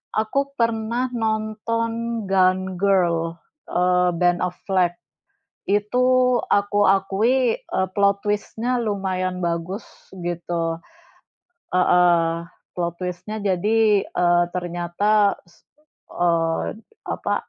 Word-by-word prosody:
Aku 275 +6 0
pernah 230 +1 0
nonton 230 +1 -2
Gone 185 -1 +2
Girl, 170 -4 +1 0.3
eee, 180 0 +2
Ben 175 +1 +2
Affleck, 180 0 0 0.8
itu 250 +4 +3
aku 205 0 +3
akui, 220 +6 +2
eee, 190 0 -2
plot 200 0 +2
twist-nya 225 +4 -1
lumayan 190 -3 -2
bagus, 170 +4 -3 0.3
gitu. 170 -1 -3 0.9
Heeh. 175 -2 +4 0.4
Plot 170 -1 -2
twist-nya 180 +4 -5
jadi, 210 +2 +2
eee, 175 0 +3
ternyata 180 +4 +1
s 175 -2 -26 0.5
eee, 165 0 0 0.3
apa, - - -1
195 Hz, 90 wpm, -22 LUFS, 175-220 Hz, 0.9 s, Heeh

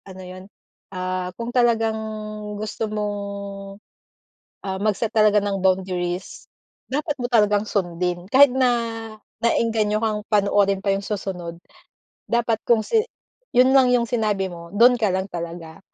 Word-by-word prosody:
Ano 190 -1 -10
yun? 185 +1 -10 0.5
Ah, 185 -1 -3
kung 235 +1 -5
talagang 230 -3 +2 0.6
gusto 215 +1 -4
mong, 210 -1 -2 1.5
ah, 190 -1 -3
mag-set 215 +2 0
talaga 210 -2 +4
ng 200 -1 -2
boundaries. 185 -1 -1 0.4
Dapat 295 +1 -2
mo 245 - -1
talagang 210 -3 +2
sundin. 175 -2 -2
Kahit 280 +2 +8
na, 255 -1 +4 0.7
nae-engganyo 220 -2 +1
kang 215 -2 -1
panoorin 200 -1 +3
pa 200 - -4
yung 195 - -5
susunod. 180 -5 -5 0.7
Dapat 235 -1 +1
kung 225 -2 +4
si 445 - +2 0.5
yun 255 +2 +6
lang 265 -1 +6
yung 245 -1 +3
sinabi 215 -5 -1
mo 170 -1 -9
dun 245 +3 +6
ka 220 - +2
lang 190 +1 -3
talaga. 170 -1 -7
210 Hz, 135 wpm, -22 LUFS, 185-230 Hz, 1.5 s, Kahit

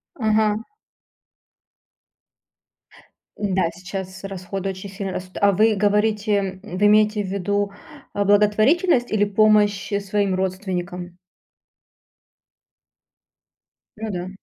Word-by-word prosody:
Ага. 215 -2 +1 2.7
Н-да, 190 -4 0
сейчас 190 +1 -7
расходы 195 0 -4
очень 190 +1 -7
сильно 195 -1 -5
растут. 185 0 -7
А 200 0 +5
вы 215 +3 +3
говорите 210 +1 +1 0.3
м, 210 -4 -7
вы 205 - +4
имеете 210 0 +4
в - - -5
виду, 200 +1 -1 0.4
а, 205 - 0
благотворительность 220 - +3
или 205 -1 +3
помощь, 210 0 +2
э, 200 - +1
своим 200 -1 0
родственникам? 180 -1 -4 2.8
Ну 220 0 -5
да. 180 0 -4
200 Hz, 100 wpm, -22 LUFS, 190-210 Hz, 2.8 s, А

